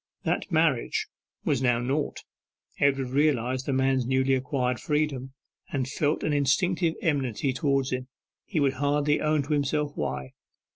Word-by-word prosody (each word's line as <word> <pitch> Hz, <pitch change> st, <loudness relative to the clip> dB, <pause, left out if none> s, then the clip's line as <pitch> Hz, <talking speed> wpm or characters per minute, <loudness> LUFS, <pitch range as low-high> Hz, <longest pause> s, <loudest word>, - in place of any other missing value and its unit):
That -, -, -1 dB
marriage 155 Hz, -7 st, +2 dB, 0.4 s
was 135 Hz, -3 st, +1 dB
now 120 Hz, -2 st, +3 dB
nought. 135 Hz, +5 st, -2 dB, 0.6 s
Edward 135 Hz, -2 st, +2 dB
realized 130 Hz, -3 st, +1 dB
the -, -, +1 dB
man's 130 Hz, -1 st, +2 dB
newly 130 Hz, +1 st, +2 dB
acquired 125 Hz, -1 st, 0 dB
freedom, 150 Hz, -4 st, -1 dB, 0.4 s
and 130 Hz, -3 st, -1 dB
felt 145 Hz, +3 st, 0 dB
an 155 Hz, -, +1 dB
instinctive 165 Hz, +4 st, +2 dB
enmity 135 Hz, -4 st, 0 dB
towards 140 Hz, -2 st, 0 dB
him 130 Hz, 0 st, -3 dB, 0.4 s
he 170 Hz, -, -2 dB
would 140 Hz, -2 st, +2 dB
hardly 145 Hz, +2 st, +1 dB
own 155 Hz, -1 st, +2 dB
to 145 Hz, +3 st, -2 dB
himself 145 Hz, +1 st, 0 dB
why. 65 Hz, 0 st, -3 dB
140 Hz, 145 wpm, -27 LUFS, 130-150 Hz, 0.6 s, now